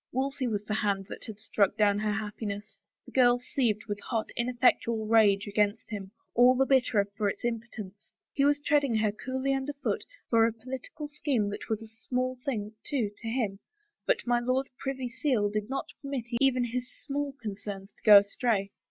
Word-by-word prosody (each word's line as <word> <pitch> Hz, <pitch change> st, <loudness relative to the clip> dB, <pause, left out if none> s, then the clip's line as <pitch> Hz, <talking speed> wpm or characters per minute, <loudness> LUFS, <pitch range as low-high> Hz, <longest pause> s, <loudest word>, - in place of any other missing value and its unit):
Wolsey's 270 Hz, 0 st, -1 dB
was 210 Hz, -2 st, -2 dB
the 215 Hz, -, -2 dB
hand 200 Hz, -2 st, 0 dB
that -, -, -8 dB
had 215 Hz, -2 st, -8 dB
struck 205 Hz, -3 st, +1 dB
down 205 Hz, -1 st, +3 dB
her 215 Hz, 0 st, 0 dB
happiness. 210 Hz, -1 st, -5 dB, 0.3 s
The -, -, -13 dB
girl 245 Hz, -2 st, +5 dB
seethed 240 Hz, -4 st, -1 dB
with 205 Hz, -1 st, -3 dB
hot, 225 Hz, 0 st, -2 dB
ineffectual 235 Hz, -2 st, +2 dB
rage 210 Hz, -3 st, +4 dB
against 210 Hz, +2 st, 0 dB
him, 200 Hz, -3 st, -5 dB, 0.2 s
all 245 Hz, +2 st, +6 dB
the 270 Hz, +1 st, +3 dB
bitterer 250 Hz, -6 st, +3 dB
for 210 Hz, -1 st, +1 dB
its 200 Hz, -, -5 dB
im 235 Hz, -1 st, 0 dB
potence. 210 Hz, -3 st, -10 dB, 0.2 s
He 275 Hz, -, +2 dB
was 290 Hz, +1 st, +4 dB
treading 285 Hz, -4 st, +2 dB
her 215 Hz, -1 st, +2 dB
coolly 260 Hz, +5 st, -2 dB
underfoot 280 Hz, +1 st, -2 dB, 0.2 s
for 225 Hz, -1 st, +5 dB
a 230 Hz, -, -2 dB
political 255 Hz, +6 st, -7 dB
scheme 280 Hz, -8 st, 0 dB
that -, -, -7 dB
was 220 Hz, 0 st, -1 dB
a -, -, -10 dB
small 250 Hz, +3 st, -3 dB
thing, 215 Hz, -5 st, -3 dB
too, 245 Hz, -8 st, -1 dB
to 230 Hz, -, -8 dB
him, 225 Hz, -5 st, -1 dB, 0.5 s
but -, -, +2 dB
my 240 Hz, 0 st, +3 dB
Lord 255 Hz, +2 st, 0 dB
Privy 265 Hz, -2 st, -3 dB
Seal 245 Hz, -4 st, 0 dB
did 210 Hz, +1 st, -2 dB
not 270 Hz, 0 st, -3 dB
permit 275 Hz, -4 st, -3 dB, 0.2 s
even 260 Hz, -2 st, +4 dB
his 245 Hz, +1 st, -3 dB, 0.2 s
small 285 Hz, -1 st, -2 dB
con 215 Hz, -3 st, -4 dB
cerns 195 Hz, -1 st, -6 dB
to -, -, -28 dB
go 210 Hz, -1 st, +10 dB
astray. 200 Hz, 0 st, +1 dB
230 Hz, 190 wpm, -29 LUFS, 210-260 Hz, 0.5 s, go